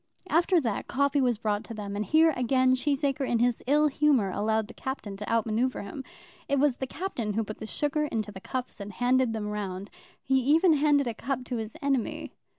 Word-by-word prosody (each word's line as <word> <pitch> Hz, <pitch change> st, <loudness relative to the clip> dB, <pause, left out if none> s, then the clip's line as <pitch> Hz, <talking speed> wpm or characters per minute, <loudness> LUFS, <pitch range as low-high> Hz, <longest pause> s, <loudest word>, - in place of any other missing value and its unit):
After 345 Hz, +3 st, +3 dB
that, 225 Hz, -6 st, -2 dB
coffee 280 Hz, +1 st, +1 dB
was 245 Hz, -3 st, +2 dB
brought 210 Hz, -1 st, -1 dB
to 230 Hz, -, -8 dB
them, 205 Hz, -1 st, -5 dB
and 205 Hz, -, -1 dB
here 315 Hz, +6 st, +4 dB
again 255 Hz, +1 st, +3 dB
Cheesacre 275 Hz, 0 st, 0 dB
in 235 Hz, -, +2 dB
his 240 Hz, 0 st, +1 dB
ill 300 Hz, +2 st, +4 dB
humour 280 Hz, -8 st, +2 dB
allowed 220 Hz, +2 st, 0 dB
the 235 Hz, -, -11 dB
Captain 265 Hz, -7 st, -5 dB
to 210 Hz, -, -5 dB
out 230 Hz, -1 st, +2 dB
manoeuvre 230 Hz, +3 st, -1 dB
him. 205 Hz, +7 st, -7 dB, 0.5 s
It 280 Hz, -, +2 dB
was 275 Hz, -2 st, +2 dB
the 265 Hz, -, -3 dB
Captain 255 Hz, -, -3 dB
who 225 Hz, +2 st, 0 dB
put 215 Hz, 0 st, -8 dB
the 220 Hz, -, -6 dB
sugar 295 Hz, +4 st, -1 dB
into 215 Hz, -7 st, -3 dB
the 190 Hz, -1 st, -10 dB
cups 255 Hz, +1 st, -5 dB
and 200 Hz, 0 st, -7 dB
handed 245 Hz, +2 st, +2 dB
them 215 Hz, -2 st, -3 dB
round. 200 Hz, -2 st, -5 dB, 0.3 s
He 265 Hz, 0 st, +2 dB
even 315 Hz, +7 st, +4 dB
handed 290 Hz, -1 st, +3 dB
a 235 Hz, -, -2 dB
cup 255 Hz, +3 st, -3 dB
to 245 Hz, -1 st, -3 dB
his 220 Hz, +6 st, -6 dB
enemy. 275 Hz, -4 st, -1 dB
250 Hz, 215 wpm, -28 LUFS, 215-280 Hz, 0.5 s, here